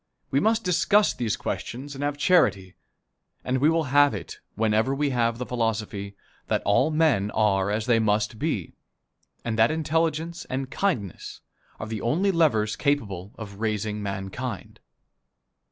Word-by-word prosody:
We 135 - +3
must 220 +4 +2
discuss 200 +3 +3
these 115 -4 -2
questions 135 +4 -5
and 140 +1 -5
have 145 0 -1
charity 100 - +3 0.7
and 130 +1 0
we 145 +4 +4
will 165 0 +2
have 145 -5 +5
it 95 - -8 0.2
whenever 110 +4 +1
we 145 0 0
have 115 -2 +1
the 125 - -4
philosophy 110 -4 -2 0.3
that - - 0
all 100 +9 +3
men 150 -11 +2
are 100 -3 +2
as 105 +1 -1
they 115 -2 +3
must 110 +1 0
be, 145 - -2 0.7
and 115 -1 -2
that 110 - +6
intelligence 160 +1 -1
and 130 0 -4
kindness 120 - -2 0.4
are - - -4
the 110 -1 -5
only 175 - +1
levers 140 - +2
capable 105 -10 -1
of 100 -3 -9
raising 105 -1 -2
mankind. 100 +3 -5
120 Hz, 150 wpm, -25 LUFS, 105-150 Hz, 0.7 s, that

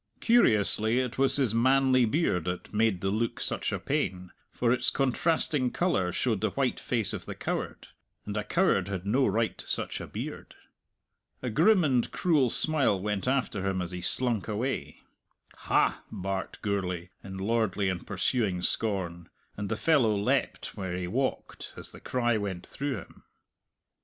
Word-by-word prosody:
Curiously 110 - +3
it 130 0 -1
was 135 0 +3
his 130 -6 +1
manly 130 +1 +4
beard 110 - +1
that 90 +3 -4
made 105 -4 +2
the 95 - 0
look 115 +3 -1
such - - -1
a - - -1
pain, 90 0 -2 0.2
for 120 0 +1
its 125 -1 +5
contrasting 135 0 +2
colour 120 - 0
showed - - 0
the - - +2
white - - -1
face - - -1
of - - -6
the - - -5
coward - - -4 0.4
and 105 - -5
a 105 - -1
coward 105 - +2
had 95 -2 -4
no 130 +7 +2
right 115 0 0
to - - -8
such - - -2
a - - -7
beard. - - -7 0.9
A 125 - -2
grim 195 - +5
and 130 -5 +2
cruel 150 -8 +2
smile 140 -8 +1
went 105 +2 -2
after 125 -7 0
him 95 -1 0
as 90 -1 -2
he 90 0 -5
slunk 120 -2 0
away. 115 +5 -3 0.6
"Ha!" - - +1
barked 95 0 -4
Gourlay, 90 -4 -2
in 95 0 -7
lordly 105 -1 0
and 95 -2 -3
pursuing 100 -2 0
scorn, 90 -5 -1 0.3
and 100 -1 -4
the 110 - 0
fellow 130 -9 +3
leapt 100 - -1
where 95 -2 -4
he 90 - -3
walked 130 +9 -3
as - - -5
the - - -12
cry 120 -3 0
went 95 -4 -4
through 140 -1 -3
him. 95 - -12
110 Hz, 165 wpm, -28 LUFS, 95-130 Hz, 0.9 s, its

